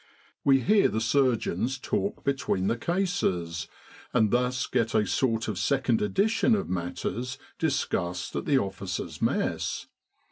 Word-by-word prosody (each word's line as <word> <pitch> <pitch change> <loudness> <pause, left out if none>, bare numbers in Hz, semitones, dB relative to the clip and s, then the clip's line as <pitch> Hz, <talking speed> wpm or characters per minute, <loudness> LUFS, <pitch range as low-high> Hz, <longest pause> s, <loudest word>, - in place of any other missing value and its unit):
We 135 -1 +5
hear 210 +5 +4
the 110 - -1
surgeons 125 +1 +1
talk 200 +9 -2
between 135 -9 0
the 115 - +2
cases, 100 - -1 0.5
and 110 -4 +4
thus 125 +1 +1
get 115 -3 0
a 105 - +4
sort 115 +1 0
of - - -2
second 130 -5 +1
edition 220 - +2
of 200 - -2
matters 105 +8 -3 0.2
discussed 90 - -1
at - - -2
the 140 - +3
Officers' 95 -4 -3
Mess. - - 0
125 Hz, 135 wpm, -27 LUFS, 100-140 Hz, 0.5 s, We